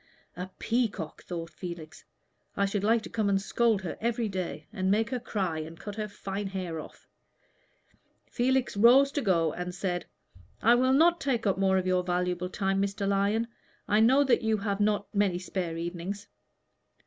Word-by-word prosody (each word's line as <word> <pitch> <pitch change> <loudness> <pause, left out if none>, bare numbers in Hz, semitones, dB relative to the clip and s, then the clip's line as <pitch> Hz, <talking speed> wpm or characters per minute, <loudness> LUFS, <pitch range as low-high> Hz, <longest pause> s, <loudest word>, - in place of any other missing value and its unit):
"A 180 +1 -5
peacock!" 220 -9 -1
thought 170 -1 -6
Felix. 160 -1 -8 0.5
"I 200 - +3
should 200 0 -1
like 225 +1 +3
to - - -8
come 215 -3 0
and 195 -1 +3
scold 215 0 +1
her 175 - -5
every 235 0 0
day, 185 -3 -4
and 190 -3 -1
make 215 +3 +2
her 255 - -1
cry 190 -8 -2
and 160 +1 -8
cut 205 - -6
her 215 -1 -2
fine 200 0 -5
hair 185 -4 -4
off." - - -12 1.2
Felix 260 0 0
rose 250 +6 +6
to 290 - -1
go, 170 - +2
and 180 0 -5
said, 185 -2 -2 0.5
"I 235 - +5
will 255 +2 +3
not 335 +4 +4
take 250 -5 0
up 195 -2 +2
any - - -2
more 190 -1 +3
of 185 - 0
your 185 0 +2
valuable 180 0 -1
time, 195 0 0
Mr. 200 0 -1
Lyon. 200 +3 +1 0.4
I 210 - +3
know 260 +6 +5
that 260 -3 +3
you 220 -1 +1
have 200 -1 -2
not 205 0 0
many 200 -3 +2
spare 180 -2 -3
evenings." 175 +4 -5
200 Hz, 185 wpm, -29 LUFS, 180-225 Hz, 1.2 s, rose